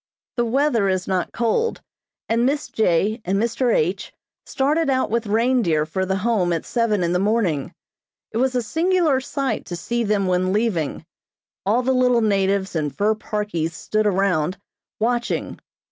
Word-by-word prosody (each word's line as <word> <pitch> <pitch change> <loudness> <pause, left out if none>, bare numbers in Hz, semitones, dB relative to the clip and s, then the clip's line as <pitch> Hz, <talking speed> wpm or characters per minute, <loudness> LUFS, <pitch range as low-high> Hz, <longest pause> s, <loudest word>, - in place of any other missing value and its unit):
The 240 - +1
weather 235 -4 +2
is 185 -1 -1
not 185 -2 -1
cold 240 - 0 0.5
and 230 +1 +1
Miss 285 +3 0
J. 215 +2 +1
and 190 +2 0
Mr. 235 +2 +1
H. 180 0 0 0.4
started 295 +3 +1
out 260 -4 +1
with 230 -1 0
reindeer 220 -8 +2
for 190 +4 -2
the 190 - 0
Home 205 -7 +2
at 165 - -3
seven 225 -5 0
in 170 0 0
the 180 - +2
morning. 195 -9 0 0.6
It - - -3
was 255 +1 +1
a 245 - +1
singular 325 - +2
sight 270 -3 -2
to 175 - -4
see 235 +7 -2
them 205 -2 +1
when 185 0 +1
leaving. 205 -9 -1 0.6
All 235 +5 +2
the 260 +1 +2
little 250 -2 +3
natives 195 -2 +1
in 150 -2 0
fur 205 +8 +1
parkies 210 -7 -3
stood 215 +4 0
around, 185 -3 +1 0.4
watching. 240 +2 -1
215 Hz, 160 wpm, -22 LUFS, 185-245 Hz, 0.6 s, little